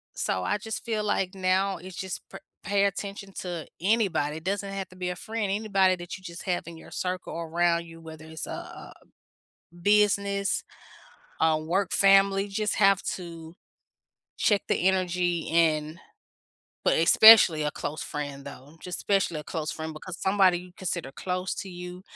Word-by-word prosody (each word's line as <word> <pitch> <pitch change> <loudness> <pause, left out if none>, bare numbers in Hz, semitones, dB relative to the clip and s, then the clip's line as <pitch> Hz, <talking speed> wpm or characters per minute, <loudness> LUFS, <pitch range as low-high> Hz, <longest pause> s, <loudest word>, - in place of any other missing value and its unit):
So, 95 - -1
I 210 - 0
just 220 0 -6
feel 220 -2 -2
like 195 -2 0
now 190 +1 +1
it's 180 +1 -10
just 190 -1 -5
pa - - -9 0.2
pay 200 0 +2
attention 200 0 -4
to 175 -3 -5 0.2
anybody. 185 -8 +1
It 160 - -10
doesn't 200 +1 -2
have 195 -1 -4
to 185 - -16
be 180 -1 -3
a 180 - -3
friend. 215 +1 -3
Anybody 195 -3 +2
that 175 +1 -7
you 190 - -19
just 170 0 -8
have 180 -2 -1
in 165 -1 -9
your - - -14
circle 185 -1 -4
around 170 +1 0
you, 165 0 -13
whether 160 -1 -11
it's 160 0 -6
a - - -11
a - - -8 0.9
business, 200 -1 +2 0.8
a 160 -1 +3
work 180 +4 -1
family, 195 0 +4
just 210 +1 -1
have 195 -2 +4 0.2
to 165 -2 -9 0.9
check 205 -3 +2
the 185 - +2
energy, 180 -2 0
and 160 -1 +2 0.9
but - - +3
especially 170 -1 +8
a 150 - -1
close 150 +2 -5
friend, 145 -2 -5
though. 140 +3 -11
Just 180 -1 -5
especially 195 -6 +1
a - - -8
close 160 0 -4
friend 160 -1 -5
because 175 +4 -8
somebody 190 -2 +3
you 180 0 -13
consider 170 -7 -4
close 180 +3 -3
to 195 - -6
you. 180 0 -8
180 Hz, 170 wpm, -27 LUFS, 165-195 Hz, 0.9 s, especially